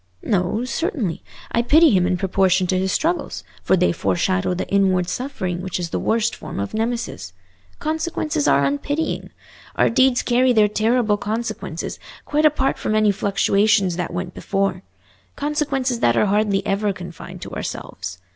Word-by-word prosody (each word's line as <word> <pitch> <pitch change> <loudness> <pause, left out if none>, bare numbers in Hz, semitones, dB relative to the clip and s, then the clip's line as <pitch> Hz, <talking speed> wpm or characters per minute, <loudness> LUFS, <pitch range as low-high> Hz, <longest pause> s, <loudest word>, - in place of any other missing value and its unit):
"No, 205 +4 0
certainly; 255 - -2 0.3
I 235 - +2
pity 310 +6 +5
him 180 -3 +3
in 185 -1 +1
proportion 190 0 +2
to 185 +1 +1
his 190 0 0
struggles, 340 - -1 0.2
for 190 - +2
they 180 - +3
foreshadow 185 +2 0
the 180 - -3
inward 190 -3 +2
suffering 185 -10 -3
which 185 -1 -3
is 170 -1 -4
the - - -1
worst 230 0 +1
form - - -7
of 100 - -4
Nemesis. 225 - -3 0.4
Consequences 310 -1 -1
are 140 - +4
unpitying. 285 - -2 0.5
Our - - +3
deeds 260 +1 +3
carry 250 +1 +3
their 215 -2 +5
terrible 215 0 +1
consequences, 220 +3 -4 0.3
quite 305 +1 +3
apart 275 -3 0
from 215 - -1
any 215 -1 +4
fluctuations 200 -1 +2
that 180 - -3
went 175 0 -4
before—consequences 255 - -3
that 120 - +3
are - - +4
hardly 205 -1 +1
ever 200 0 0
confined 175 -3 -9
to - - -8
ourselves. 90 0 -6
205 Hz, 155 wpm, -21 LUFS, 185-250 Hz, 0.5 s, pity